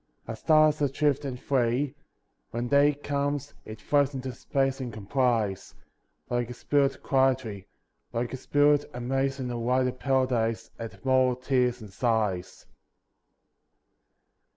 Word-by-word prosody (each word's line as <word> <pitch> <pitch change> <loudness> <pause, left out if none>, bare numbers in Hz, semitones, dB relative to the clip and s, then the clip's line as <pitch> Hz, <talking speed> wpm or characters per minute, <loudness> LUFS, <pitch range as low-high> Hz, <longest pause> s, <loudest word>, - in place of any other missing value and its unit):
A 115 - -4
star 155 +6 +5
is 150 0 -4
adrift 145 0 +1
and 130 -2 -4
free. 130 +1 0 0.6
When 120 +1 -3
day 145 +1 +4
comes, 145 0 -2
it 110 0 -9
floats 145 +3 +1
into 130 -1 -4
space 135 +2 -1
and 125 -2 -4
com 105 -2 -9
plies; 115 -6 0 0.5
Like 120 -1 -1
a 125 - -7
spirit 140 +1 0
quietly, 130 -7 +1 0.4
Like 120 +2 -2
a - - -3
spirit, 145 +2 +2
amazed 135 +2 -1
in 125 -2 -3
a 120 - -3
wider 125 +2 +1
paradise 125 -4 0
At 115 +3 -8
mortal 130 -1 +3
tears 125 -1 0
and 105 -3 -11
sighs. 105 -6 -1
130 Hz, 135 wpm, -27 LUFS, 120-140 Hz, 0.6 s, star